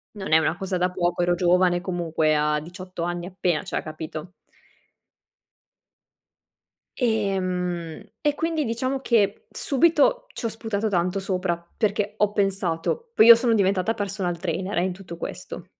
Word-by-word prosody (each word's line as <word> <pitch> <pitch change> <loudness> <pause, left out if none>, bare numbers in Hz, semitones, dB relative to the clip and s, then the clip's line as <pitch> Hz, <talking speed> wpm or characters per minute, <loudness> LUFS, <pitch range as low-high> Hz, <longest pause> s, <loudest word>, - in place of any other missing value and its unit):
non 190 -5 -6
è 160 - +7
una 160 +1 +1
cosa 190 -1 -3
da 180 +1 +1
poco. 175 -1 0
Ero 175 0 +2
giovane 175 0 +3
comunque 165 -4 0
a 150 0 +1
18 180 +1 -7
anni 175 0 -3
appena 180 -3 -1
cioè, - - -3
capito. 155 +2 -7 2.7
E 220 -6 +1
mhmm, 180 -3 -3 0.2
e 295 -1 +1
quindi 325 0 -1
diciamo 255 +3 -2
che 210 -6 +1
subito 335 - +2
ci 245 - -6
ho - - +3
sputato 220 -1 -2
tanto 180 0 0
sopra 180 -3 -2
perché 210 -1 0
ho 210 -1 +2
pensato 195 - -1
poi 220 - +6
io 235 0 +11
sono 230 0 +1
diventata 200 +1 +2
personal 195 -4 -3
trainer, 185 +2 -3
eh, 175 - +3
in 185 - -2
tutto 180 -3 -10
questo. - - -7
185 Hz, 150 wpm, -24 LUFS, 175-220 Hz, 2.7 s, io